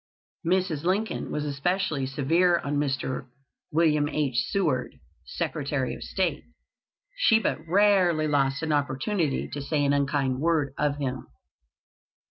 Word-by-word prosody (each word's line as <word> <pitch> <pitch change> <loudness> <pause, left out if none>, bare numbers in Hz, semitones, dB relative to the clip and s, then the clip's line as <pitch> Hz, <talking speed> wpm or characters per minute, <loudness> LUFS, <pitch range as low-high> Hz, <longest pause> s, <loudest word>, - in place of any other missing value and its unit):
Mrs. 175 -3 0
Lincoln 195 +5 -1
was 150 - -2
especially 150 0 -1
severe 165 +6 +2
on 145 -2 -2
Mr. 135 -2 -2 0.4
Wm. 150 -2 +2
H. 135 -6 0
Seward, 200 -1 -1 0.3
Secretary - - -2
of - - -9
State. - - -1 0.7
She 245 - +5
but 210 -8 -1
rarely 180 -4 +3
lost 135 -1 +1
an 160 - -1
opportunity 145 +3 0
to 145 - -5
say 145 +1 0
an 140 - +3
unkind 140 -2 0
word 155 -3 +1
of 150 -1 0
him. 130 -3 -4
150 Hz, 125 wpm, -26 LUFS, 140-175 Hz, 0.7 s, She